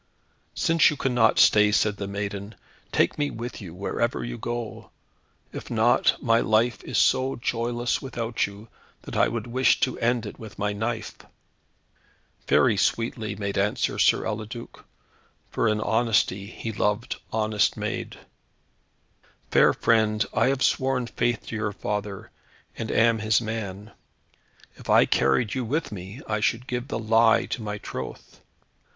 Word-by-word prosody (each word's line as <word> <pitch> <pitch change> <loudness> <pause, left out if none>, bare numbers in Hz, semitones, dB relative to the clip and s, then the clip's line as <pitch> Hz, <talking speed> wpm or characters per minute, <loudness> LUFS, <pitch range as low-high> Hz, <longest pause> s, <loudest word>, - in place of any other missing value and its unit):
"Since 165 -1 +4
you 150 - -4
cannot 120 -5 +2
stay," 105 0 +6
said 105 -1 +2
the 100 - -4
maiden, 100 +1 -5 0.4
"take 85 - +1
me 145 0 +1
with 120 +1 -7
you, 85 -4 -9
wherever 115 +5 -2
you 120 0 -5
go. 120 -1 -5 0.6
If - - -7
not, - - +3
my 115 0 +3
life 110 +1 +1
is - - -3
so 130 +1 +3
joyless 120 0 -1
without 115 -3 -2
you, 100 +2 -12 0.4
that - - -8
I - - +4
would 115 -2 -4
wish 130 +2 +2
to 130 - 0
end 120 -1 +1
it 105 - -8
with 110 -2 -10
my 105 0 -1
knife." 110 +2 -4 1.3
Very 115 -5 +4
sweetly 110 0 -1
made 100 -1 -2
answer 105 +2 0
Sir - - +3
Eliduc, 110 +2 -6 0.7
for - - +1
in 105 0 0
honesty 105 -3 +1
he 115 +1 -6
loved 105 +2 -1
honest 110 -2 +1
maid, - - -4 1.3
"Fair - - +6
friend, 110 -1 +2
I 115 - +3
have 135 0 +1
sworn 130 -1 +1
faith 120 0 -1
to - - -4
your 105 -1 -2
father, 105 -1 -4 0.4
and 110 - -5
am 115 -1 +3
his 110 0 +2
man. 110 -2 -5 0.9
If - - -13
I - - +6
carried 100 - +2
you 130 - -2
with 145 +6 -2
me, 100 +6 -8
I 110 0 -1
should 115 +3 0
give 125 0 -4
the - - -3
lie 115 0 +4
to - - -4
my 105 -1 -4
troth. - - -8
110 Hz, 150 wpm, -25 LUFS, 105-120 Hz, 1.3 s, stay